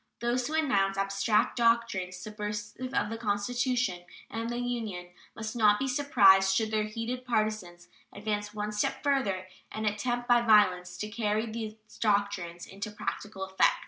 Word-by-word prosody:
Those 240 +1 0
who 310 - -3
announce 200 -11 +2
abstract 195 +4 +1
doctrines 230 -6 +1
subversive 210 +5 -5
of 220 - 0
the 225 - -4
Constitution 230 -1 0 0.3
and 230 +1 -3
the 240 - -3
Union 225 -8 -3 0.3
must 220 +1 -5
not 210 -3 +5
be 270 - -1
surprised 195 -9 +5
should 220 +1 0
their 215 -1 +1
heated 230 +4 -4
partisans 215 -7 -2 0.2
advance 210 0 -3
one 210 0 -3
step 210 0 -1
further 235 -10 +1 0.3
and 215 0 -4
attempt 240 +4 -1
by 240 -1 +5
violence 185 -6 +4
to 210 - -3
carry 215 0 -1
these 220 -1 -5 0.2
doctrines 200 -5 0
into 200 +2 -6
practical 205 -1 -5
effect. 190 0 +3
215 Hz, 150 wpm, -29 LUFS, 195-235 Hz, 0.3 s, not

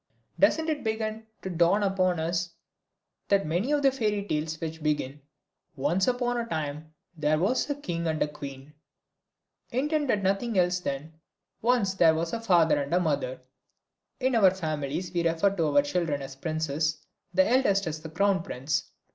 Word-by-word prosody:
Doesn't 320 0 +3
it 305 -3 -1
begin 220 0 -3 0.2
to 190 - -4
dawn 175 +4 +3
upon 185 -3 +1
us 170 +2 -1 0.8
that 200 -1 +4
the - - -7
many 175 - 0 0.2
fairy 210 -6 -1
tales 155 -1 -2
which 160 0 -5
begin 150 -2 -1 0.5
"Once 160 +8 +1
upon 245 -1 0
a 235 - -2
time 155 -3 -4 0.2
there 155 -1 +1
was 205 - +1
a 285 - 0
king 170 -12 -3
and 160 -1 -1
a - - -1
queen" 140 -1 -9 1.0
intend 295 +4 0 0.2
nothing 200 +3 0
else 180 0 +3
than, 150 -1 -4 0.5
"Once 230 -5 +2
there 165 -4 +5
was 165 +1 -2
a 230 - -2
father 165 -8 +4
and 140 - -5
a - - +4
mother?" 140 -7 -1 0.8
In 260 0 +1
our 210 -5 +6
families 160 -1 -3
we 175 - +1
refer 165 +4 +2
to 165 -4 +1
our 145 -1 +4
children 145 -2 -1
as 135 0 -8
princes, 155 0 -2 0.3
the 190 +1 +3
eldest 215 -5 +3
as 155 -1 -4
the 160 - -8
crown 195 +3 +2
prince. 145 -1 -2
170 Hz, 165 wpm, -27 LUFS, 155-200 Hz, 1.0 s, our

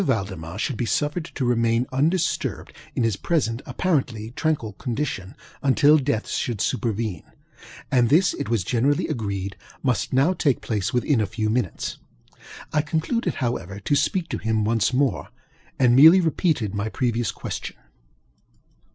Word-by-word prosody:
Valdemar 95 - -2
should 120 +2 -2
be 120 - -1
suffered 150 +6 -1
to 140 -6 -4
remain 115 0 +2
undisturbed 160 +7 0 0.2
in 125 - +1
his 115 -3 +1
present 125 -4 -1
apparently 125 -11 -1
tranquil 135 -6 -1
condition, 115 -5 -4 0.3
until 145 +3 +5
death 130 -5 -1
should 120 -3 -2
superveneŌĆöand 110 -2 -2 0.9
this, 175 +7 +4
it 140 - -4
was 115 -5 +1
generally 130 +8 +1
agreed, 100 -8 -3 0.3
must 125 -4 0
now 135 +8 +3
take 140 -7 +1
place 105 -1 -2
within 125 0 +1
a 105 - 0
few 110 +1 -2
minutes. 115 -6 -2 0.7
I 150 - +3
concluded, 160 - -1
however, 100 - -3
to 125 +8 0
speak 175 +4 +1
to - - -3
him 110 -1 0
once 115 0 +2
more, 135 +1 0 0.5
and 125 -2 +4
merely 160 +7 +9
repeated 155 - 0
my 100 +1 -2
previous 120 -3 -1
question. - - -6
120 Hz, 140 wpm, -24 LUFS, 110-145 Hz, 0.9 s, merely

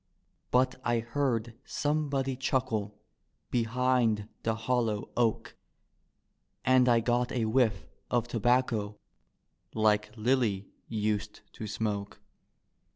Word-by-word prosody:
But 130 +1 +2
I 120 0 +2
heard 120 -1 -1
somebody 145 -3 -1
chuckle 120 -6 -1 0.5
behind 120 -2 +1
the 110 -1 0
hollow 115 -2 -1
oak 115 -2 0 1.1
And 130 0 +5
I 115 -1 +5
got 120 +1 +1
a 120 -3 0
whifE 110 -3 +2 0.2
of 120 -1 +1
tobacco 115 -3 +1 0.8
like 105 -1 +3
Lilly 110 -4 +1 0.2
used 105 -1 -2
to 110 - -6
smoke. 105 -1 -3
115 Hz, 95 wpm, -30 LUFS, 110-125 Hz, 1.1 s, And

